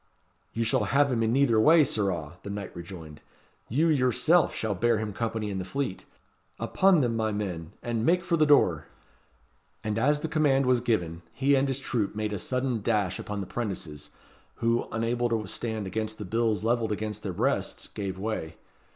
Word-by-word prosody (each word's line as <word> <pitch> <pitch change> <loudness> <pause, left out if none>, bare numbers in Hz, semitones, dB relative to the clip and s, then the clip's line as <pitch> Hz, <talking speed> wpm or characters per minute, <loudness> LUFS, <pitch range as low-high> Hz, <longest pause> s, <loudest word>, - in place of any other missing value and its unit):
"You 115 - -1
shall 110 -2 +1
have 140 +6 +3
him 115 -2 +1
in 110 0 +2
neither 125 -3 +3
way, 155 +7 +6
sirrah," 90 - -2
the 100 - -8
knight 100 -1 -6
rejoined. 85 -4 -9 0.5
"You, 150 +9 +2
yourself, 155 +3 +3
shall 110 -2 -2
bear 115 +4 +2
him 105 -1 -3
company 110 -1 -2
in 95 - -3
the - - -3
Fleet. 130 +1 -4 0.5
Upon 190 -4 +3
them, 120 -3 0
my 110 -1 0
men, 90 -6 -4
and 115 -2 -1
make 175 +7 +3
for 185 -2 +1
the 155 -2 +3
door!" 85 - +4 1.0
And 105 0 -1
as 145 +4 +2
the - - -2
command 145 -4 +2
was 125 -1 +3
given, 90 -9 -1
he 140 +1 +2
and 135 0 +3
his 135 -1 -1
troop 115 -7 -2
made 105 0 -2
a 100 - -3
sudden 125 +2 -1
dash 105 -4 0
upon 105 -1 -4
the - - -4
'prentices, 90 -10 -5 0.5
who, 115 0 0
unable 120 +2 0
to 110 -2 -1
stand 110 +1 -4
against 110 +3 -3
the 105 - -6
bills 110 +1 0
levelled 115 -1 +1
against 105 0 -3
their 100 - -3
breasts, - - -1
gave 95 -2 -5
way. 95 -6 -4
110 Hz, 185 wpm, -27 LUFS, 100-125 Hz, 1.0 s, way